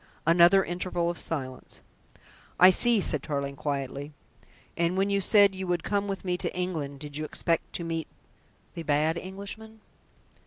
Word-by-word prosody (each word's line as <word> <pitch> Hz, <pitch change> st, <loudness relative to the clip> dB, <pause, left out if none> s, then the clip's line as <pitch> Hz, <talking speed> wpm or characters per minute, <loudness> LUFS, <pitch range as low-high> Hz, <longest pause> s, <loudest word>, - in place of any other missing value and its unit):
Another 175 Hz, +4 st, +6 dB
interval 175 Hz, -1 st, -2 dB
of 175 Hz, -, -8 dB
silence. 130 Hz, -5 st, -4 dB, 0.8 s
"I 185 Hz, +1 st, +9 dB
see," 235 Hz, +2 st, +3 dB
said 150 Hz, -6 st, 0 dB
Tarling 140 Hz, -1 st, -3 dB
quietly. 140 Hz, 0 st, -4 dB, 0.6 s
"And 170 Hz, +2 st, 0 dB
when 195 Hz, +1 st, +1 dB
you 200 Hz, 0 st, +2 dB
said 200 Hz, 0 st, +5 dB
you 190 Hz, 0 st, -5 dB
would 175 Hz, -2 st, 0 dB
come 205 Hz, 0 st, -1 dB
with 195 Hz, -1 st, -4 dB
me 180 Hz, -1 st, 0 dB
to -, -, -2 dB
England, 155 Hz, -6 st, -3 dB
did 145 Hz, -1 st, -7 dB
you 155 Hz, -, -3 dB
expect 165 Hz, +2 st, -2 dB
to 170 Hz, -, -1 dB
meet 165 Hz, -2 st, -3 dB, 0.7 s
the 170 Hz, -, -6 dB
bad 155 Hz, +1 st, +1 dB
Englishman?" 200 Hz, +5 st, -8 dB
170 Hz, 160 wpm, -27 LUFS, 150-190 Hz, 0.8 s, I